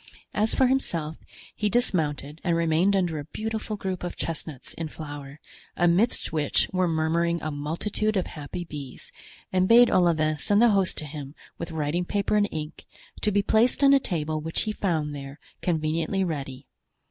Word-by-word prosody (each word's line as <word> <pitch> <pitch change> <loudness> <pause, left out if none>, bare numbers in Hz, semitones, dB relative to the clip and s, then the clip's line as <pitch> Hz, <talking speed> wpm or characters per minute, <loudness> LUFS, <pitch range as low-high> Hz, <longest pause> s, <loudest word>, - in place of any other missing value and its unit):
As 215 +1 +1
for 265 - +4
himself, 170 - 0 0.4
he 210 - 0
dismounted 155 - 0
and 170 -2 +2
remained 170 +4 +3
under 175 -5 0
a 145 - -6
beautiful 215 +6 -4
group 190 -3 -4
of 175 - -4
chestnuts 155 -4 -5
in 165 - -4
flower, 145 -2 -8 0.4
amidst 175 +6 +2
which 150 -3 +2
were 185 -1 +2
murmuring 170 +1 +1
a 155 - -2
multitude 170 +9 -1
of 185 - +1
happy 155 +4 -6
bees, 145 -6 -8 0.4
and 185 0 +3
bade 240 +2 +7
Olivain 155 -4 +3
send 205 +7 +3
the 240 +1 +6
host 195 -3 +2
to 155 - -3
him 145 -1 -8 0.2
with 170 - -4
writing 160 +2 -1
paper 200 +2 0
and 205 -1 +3
ink, 155 0 -6 0.3
to 210 - +2
be 205 0 +2
placed 235 +7 +3
on 275 0 +7
a 275 - +6
table 155 - -2
which 160 +1 -2
he 215 - -1
found 160 -8 -1
there, 140 0 -8 0.2
conveniently 165 +3 0
ready. 135 -6 -4
165 Hz, 170 wpm, -26 LUFS, 155-200 Hz, 0.4 s, bade